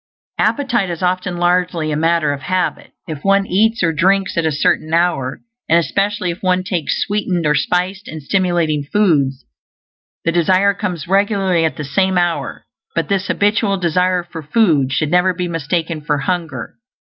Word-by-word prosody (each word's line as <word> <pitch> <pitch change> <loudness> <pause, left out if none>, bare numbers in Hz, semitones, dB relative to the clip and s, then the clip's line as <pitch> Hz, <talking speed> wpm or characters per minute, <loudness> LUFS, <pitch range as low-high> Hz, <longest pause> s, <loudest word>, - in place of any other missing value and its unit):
Appetite 240 -9 +1
is 170 0 -5
often 180 0 -1
largely 175 -2 +1
a - - 0
matter 165 -1 +1
of 140 - -7
habit; 185 +4 -2
if 155 -3 -6
one 195 0 +3
eats 220 +3 +1
or 165 -1 +2
drinks 190 +4 +1
at 165 -2 +1
a - - +1
certain 155 +2 0
hour, 145 -6 0 0.3
and 165 - +5
especially 185 +4 0
if 170 - -9
one 185 -1 +1
takes 175 -4 -2
sweetened 195 -5 -1
or 150 - +3
spiced 185 +6 -1
and 155 -2 -8
stimulating 170 -3 +1
foods, 140 -7 +1 0.8
the 165 - +2
desire 185 +4 +3
comes 180 -7 -4
regularly 195 -3 +2
at 155 -5 -2
the 150 - -4
same 190 +6 +1
hour; 175 -1 -1 0.3
but - - -1
this 195 -1 0
habitual 205 -1 +1
desire 180 +1 +1
for 170 -2 -9
food 155 - +2
should 150 +2 0
never 180 +1 +3
be 180 0 -2
mistaken 165 0 -2
for 150 0 -1
hunger. 170 +7 -4
175 Hz, 170 wpm, -17 LUFS, 155-190 Hz, 0.8 s, and